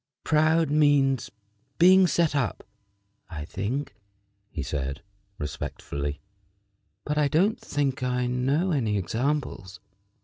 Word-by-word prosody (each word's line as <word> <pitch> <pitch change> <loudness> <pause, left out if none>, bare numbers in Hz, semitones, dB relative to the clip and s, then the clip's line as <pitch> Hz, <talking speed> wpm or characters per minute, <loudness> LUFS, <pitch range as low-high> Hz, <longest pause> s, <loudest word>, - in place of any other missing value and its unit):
"Proud 155 0 +3
means 145 -4 +3 0.5
being 185 +2 +7
set 165 -3 +1
up, 140 -4 -1 0.7
I 75 -4 -6
think," 115 - -3 0.6
he 75 -7 -5
said, 70 0 -4 0.3
respectfully; 75 -1 -5 0.8
"but 150 0 0
I 150 - +3
don't 180 +9 +2
think 140 -1 -2
I 125 0 0
know 135 +9 0
any 115 -9 0
examples." 110 - -2
135 Hz, 105 wpm, -26 LUFS, 100-150 Hz, 0.8 s, being